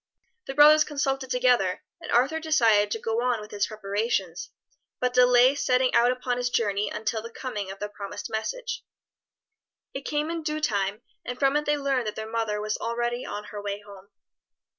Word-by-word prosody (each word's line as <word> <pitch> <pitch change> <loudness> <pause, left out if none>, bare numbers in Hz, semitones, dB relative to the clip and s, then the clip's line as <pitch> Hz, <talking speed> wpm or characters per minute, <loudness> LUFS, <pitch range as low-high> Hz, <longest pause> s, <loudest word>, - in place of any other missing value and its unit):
The 270 - -5
brothers 300 +2 +8
consulted 270 -3 -2
together, 245 -7 +2 0.2
and - - -7
Arthur 270 +7 +3
decided 230 -10 +3
to 225 - -2
go 225 +1 -1
on 245 -2 +1
with 210 0 -10
his 205 -1 0
preparations, 200 -4 -2 0.5
but 250 0 0
delay 250 +1 +6
setting 255 -2 +1
out 235 +1 +5
upon 250 -1 -2
his 245 0 -1
journey 205 -4 0
until 220 0 -2
the 230 - -8
coming 215 -5 -5
of 195 - -7
the 210 - -4
promised 200 -1 -7
message. - - -4 1.1
It 270 - -4
came 300 +3 -1
in 335 -1 -3
due 305 0 -2
time, 205 -5 -1 0.2
and 250 0 -5
from 275 +1 +2
it 300 0 +1
they 295 0 +2
learned 270 -4 0
that 210 - -3
their 220 - -5
mother 220 -2 -1
was 215 0 -2
already 240 +1 -2
on 210 - -5
her 205 - -5
way 205 0 -4
home. 200 -2 -14
240 Hz, 185 wpm, -26 LUFS, 210-270 Hz, 1.1 s, brothers